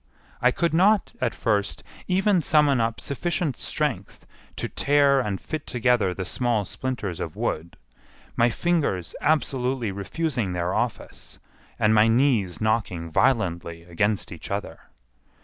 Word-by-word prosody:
I 125 Hz, -, +5 dB
could 170 Hz, +5 st, 0 dB
not, 200 Hz, +7 st, +3 dB
at -, -, 0 dB
first, 105 Hz, -3 st, -1 dB, 0.2 s
even 190 Hz, 0 st, +2 dB
summon 145 Hz, -5 st, +3 dB
up 115 Hz, 0 st, -1 dB
sufficient 160 Hz, 0 st, -2 dB
strength -, -, -3 dB, 0.3 s
to -, -, -3 dB
tear 140 Hz, -1 st, +3 dB
and 105 Hz, -6 st, -2 dB
fit 155 Hz, -2 st, -6 dB
together 120 Hz, -5 st, +2 dB
the 95 Hz, +1 st, -4 dB
small 115 Hz, 0 st, 0 dB
splinters 105 Hz, -6 st, -4 dB
of -, -, -5 dB
wood, 85 Hz, +2 st, -3 dB, 0.6 s
my 115 Hz, +1 st, +4 dB
fingers 145 Hz, -, -1 dB
absolutely 130 Hz, -6 st, 0 dB
refusing 105 Hz, -, -2 dB
their 90 Hz, 0 st, -1 dB
office, -, -, -4 dB, 0.4 s
and 105 Hz, +1 st, +3 dB
my 110 Hz, 0 st, +5 dB
knees 115 Hz, -, +2 dB
knocking 105 Hz, -7 st, -1 dB
violently 85 Hz, -8 st, 0 dB
against 100 Hz, +4 st, -1 dB
each -, -, -9 dB
other. -, -, -4 dB
120 Hz, 130 wpm, -25 LUFS, 100-145 Hz, 0.6 s, I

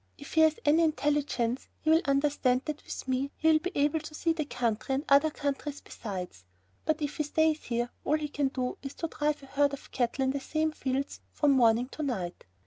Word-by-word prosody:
If 285 Hz, -, -10 dB
he 320 Hz, -, +5 dB
has 315 Hz, -1 st, +4 dB
any 305 Hz, +3 st, +5 dB
intelligence 290 Hz, -6 st, 0 dB
he 315 Hz, -, +2 dB
will 325 Hz, +1 st, +6 dB
understand 275 Hz, -2 st, +2 dB
that 305 Hz, -1 st, -4 dB
with -, -, -7 dB
me 260 Hz, +2 st, 0 dB
he 320 Hz, -, +3 dB
will 310 Hz, -, +5 dB
be 360 Hz, +4 st, -3 dB
able 290 Hz, +2 st, +2 dB
to 305 Hz, 0 st, -9 dB
see 330 Hz, +1 st, +1 dB
the 315 Hz, -2 st, -2 dB
country 240 Hz, -1 st, -1 dB
and 280 Hz, +4 st, -2 dB
other 280 Hz, +3 st, +5 dB
countries 285 Hz, 0 st, -3 dB
besides; 180 Hz, -, -7 dB, 0.4 s
but 310 Hz, -1 st, 0 dB
if 290 Hz, 0 st, -3 dB
he 305 Hz, -, +1 dB
stays 315 Hz, +1 st, +1 dB
here 240 Hz, 0 st, -1 dB
all 305 Hz, -, +2 dB
he 305 Hz, -1 st, -3 dB
can 285 Hz, -1 st, 0 dB
do 255 Hz, -2 st, -3 dB
is 275 Hz, 0 st, -7 dB
to 330 Hz, -, -3 dB
drive 300 Hz, -2 st, -1 dB
a -, -, -9 dB
herd 280 Hz, +1 st, +1 dB
of 280 Hz, -, -8 dB
cattle 250 Hz, +1 st, 0 dB
in 265 Hz, -, +2 dB
the 280 Hz, -, -2 dB
same 310 Hz, +3 st, 0 dB
fields 270 Hz, -2 st, -2 dB
from 295 Hz, -2 st, +3 dB
morning 240 Hz, -2 st, +4 dB
to 310 Hz, -, -7 dB
night. 195 Hz, -12 st, -3 dB
285 Hz, 225 wpm, -29 LUFS, 260-305 Hz, 0.4 s, will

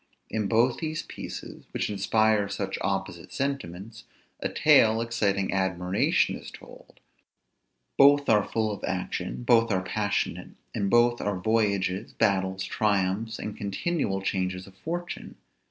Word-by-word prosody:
In 110 Hz, -2 st, -1 dB
both 120 Hz, +4 st, +3 dB
these 155 Hz, -1 st, -3 dB
pieces, -, -, -8 dB
which -, -, -2 dB
inspire 105 Hz, 0 st, +2 dB
such 95 Hz, -1 st, -3 dB
opposite 95 Hz, -3 st, -3 dB
sentiments, 115 Hz, -5 st, -4 dB, 0.3 s
a -, -, -2 dB
tale 110 Hz, 0 st, +5 dB
exciting 105 Hz, -5 st, 0 dB
admiration 95 Hz, -1 st, +1 dB
is -, -, -9 dB
told; -, -, -15 dB, 1.0 s
both 140 Hz, +1 st, +6 dB
are 105 Hz, -2 st, +4 dB
full 110 Hz, 0 st, -1 dB
of 100 Hz, -, -7 dB
action, 90 Hz, +3 st, -3 dB
both 115 Hz, -2 st, +4 dB
are 95 Hz, -1 st, +1 dB
passionate; 100 Hz, +2 st, -2 dB, 0.2 s
in 100 Hz, -1 st, -1 dB
both 120 Hz, +1 st, +4 dB
are 105 Hz, -2 st, -1 dB
voyages, 100 Hz, -2 st, 0 dB
battles, 95 Hz, -1 st, +1 dB
triumphs, 105 Hz, +2 st, 0 dB
and 105 Hz, -, -5 dB
continual 100 Hz, -, -2 dB
changes 90 Hz, -1 st, -2 dB
of 95 Hz, -, -15 dB
fortune. 175 Hz, -, -5 dB
105 Hz, 130 wpm, -27 LUFS, 95-115 Hz, 1.0 s, both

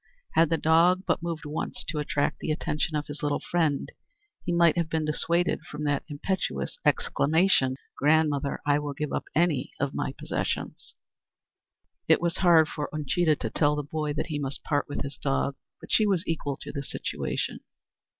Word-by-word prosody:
Had 165 Hz, -1 st, +4 dB
the 165 Hz, -, +2 dB
dog 170 Hz, +4 st, +4 dB
but -, -, +1 dB
moved 165 Hz, -2 st, -4 dB
once 150 Hz, +2 st, -3 dB
to 155 Hz, -, -1 dB
attract 145 Hz, -1 st, 0 dB
the -, -, -4 dB
attention 155 Hz, 0 st, -1 dB
of 150 Hz, 0 st, -1 dB
his 145 Hz, +1 st, -7 dB
little 145 Hz, -1 st, 0 dB
friend, 160 Hz, -5 st, 0 dB, 0.5 s
he 175 Hz, -, -2 dB
might 170 Hz, -2 st, +5 dB
have 170 Hz, -2 st, 0 dB
been 160 Hz, -1 st, 0 dB
dissuaded 170 Hz, +3 st, +1 dB
from 150 Hz, 0 st, -5 dB
that 145 Hz, -1 st, 0 dB
impetuous 145 Hz, -, -2 dB
exclamation: 155 Hz, -4 st, +3 dB, 0.2 s
"Grandmother, 150 Hz, -1 st, +2 dB
I 145 Hz, 0 st, +3 dB
will 145 Hz, -1 st, -4 dB
give 150 Hz, 0 st, -3 dB
up -, -, -2 dB
any 155 Hz, -5 st, +1 dB
of 140 Hz, 0 st, -1 dB
my 135 Hz, -, -2 dB
possessions!" -, -, -4 dB, 1.1 s
It -, -, +5 dB
was 170 Hz, 0 st, 0 dB
hard 170 Hz, -4 st, +6 dB
for 150 Hz, -2 st, -4 dB
Uncheedah 155 Hz, +2 st, +1 dB
to 115 Hz, -6 st, -4 dB
tell 150 Hz, -1 st, +2 dB
the 150 Hz, -, -2 dB
boy 150 Hz, +1 st, -2 dB
that -, -, -2 dB
he 150 Hz, -2 st, -2 dB
must 140 Hz, -1 st, -4 dB
part 145 Hz, -1 st, 0 dB
with 145 Hz, -, -3 dB
his 140 Hz, +1 st, -6 dB
dog, 140 Hz, -1 st, 0 dB, 0.2 s
but -, -, -11 dB
she 215 Hz, -, +4 dB
was 190 Hz, -2 st, +1 dB
equal 145 Hz, -4 st, -2 dB
to -, -, -6 dB
the 140 Hz, -, -4 dB
situation. 140 Hz, -, -3 dB
150 Hz, 180 wpm, -27 LUFS, 145-165 Hz, 1.1 s, hard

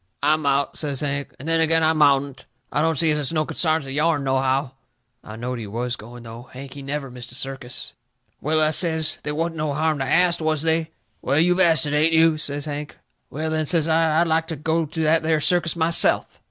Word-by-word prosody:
"I 150 Hz, +2 st, +4 dB
mout," 140 Hz, -2 st, 0 dB
says 145 Hz, -4 st, -1 dB
Hank, 140 Hz, -1 st, -3 dB
"and 140 Hz, -, -10 dB
then 165 Hz, 0 st, +2 dB
agin 165 Hz, 0 st, +2 dB
I 160 Hz, 0 st, +3 dB
moutn't. 140 Hz, -3 st, +1 dB, 0.2 s
I -, -, 0 dB
don't 160 Hz, -1 st, +1 dB
see 160 Hz, 0 st, +3 dB
as 150 Hz, -, +1 dB
it's 145 Hz, -1 st, -1 dB
no 155 Hz, -2 st, 0 dB
consarns 160 Hz, -2 st, 0 dB
of 135 Hz, -, -7 dB
yourn, 150 Hz, +1 st, +1 dB
nohow." 135 Hz, 0 st, 0 dB, 0.5 s
I 110 Hz, -, -10 dB
knowed 120 Hz, +2 st, -5 dB
he 110 Hz, -, -7 dB
was 120 Hz, +4 st, -3 dB
going, 120 Hz, +2 st, -12 dB
though. 120 Hz, +2 st, -11 dB
Hank, 135 Hz, +1 st, -9 dB
he 140 Hz, -, -9 dB
never 140 Hz, -1 st, -5 dB
missed 120 Hz, -1 st, -9 dB
a -, -, -3 dB
circus. 135 Hz, -2 st, -5 dB, 0.5 s
"Well," 155 Hz, +2 st, 0 dB
I 155 Hz, 0 st, +3 dB
says, 160 Hz, -1 st, +1 dB
"they 150 Hz, -, -4 dB
wasn't 165 Hz, +2 st, -3 dB
no 150 Hz, -2 st, -2 dB
harm 155 Hz, -1 st, 0 dB
to -, -, 0 dB
ast, 170 Hz, +4 st, +2 dB
was 155 Hz, -1 st, 0 dB
they?" 160 Hz, 0 st, 0 dB, 0.3 s
"Well, 135 Hz, +2 st, 0 dB
you've 180 Hz, +3 st, +3 dB
asted, 160 Hz, -5 st, +3 dB
ain't 155 Hz, +2 st, +2 dB
you?" 160 Hz, -1 st, +4 dB
says 145 Hz, -1 st, -3 dB
Hank. 150 Hz, 0 st, -6 dB, 0.3 s
"Well, 155 Hz, +2 st, -4 dB
then," 155 Hz, -1 st, -1 dB
says 165 Hz, -2 st, +2 dB
I, 160 Hz, -1 st, +2 dB
"I'd -, -, +3 dB
like 160 Hz, 0 st, 0 dB
to 165 Hz, -, -4 dB
go 160 Hz, +2 st, -1 dB
to 160 Hz, +2 st, -3 dB
that 160 Hz, +1 st, +3 dB
there 160 Hz, -1 st, +1 dB
circus 170 Hz, +2 st, +2 dB
myself." 165 Hz, 0 st, +2 dB
155 Hz, 225 wpm, -22 LUFS, 135-160 Hz, 0.5 s, I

